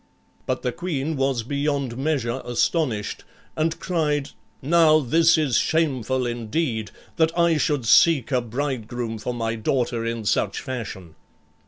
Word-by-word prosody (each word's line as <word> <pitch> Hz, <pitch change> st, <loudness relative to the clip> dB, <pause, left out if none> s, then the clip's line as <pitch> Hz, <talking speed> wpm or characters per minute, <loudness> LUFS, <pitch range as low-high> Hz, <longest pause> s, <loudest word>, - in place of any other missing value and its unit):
But 130 Hz, 0 st, -2 dB
the 125 Hz, -, 0 dB
queen 160 Hz, -3 st, -3 dB
was 135 Hz, -3 st, 0 dB
beyond 140 Hz, -1 st, -2 dB
measure 130 Hz, -3 st, -1 dB
astonished, 120 Hz, -, -1 dB, 0.3 s
and 160 Hz, +1 st, -1 dB
cried, 150 Hz, -5 st, -1 dB, 0.3 s
"Now 155 Hz, +1 st, +5 dB
this 160 Hz, +5 st, +4 dB
is 140 Hz, -7 st, +2 dB
shameful 130 Hz, -5 st, 0 dB
indeed, 120 Hz, 0 st, -2 dB, 0.3 s
that 160 Hz, 0 st, +3 dB
I 170 Hz, -2 st, +3 dB
should 145 Hz, -4 st, 0 dB
seek 145 Hz, +2 st, +5 dB
a 125 Hz, -2 st, +2 dB
bridegroom 120 Hz, -2 st, -4 dB
for 125 Hz, +3 st, -4 dB
my 115 Hz, -1 st, -2 dB
daughter 115 Hz, +1 st, -1 dB
in 115 Hz, -1 st, -3 dB
such 100 Hz, -1 st, 0 dB
fashion." 100 Hz, -10 st, -6 dB
130 Hz, 135 wpm, -23 LUFS, 115-155 Hz, 0.3 s, Now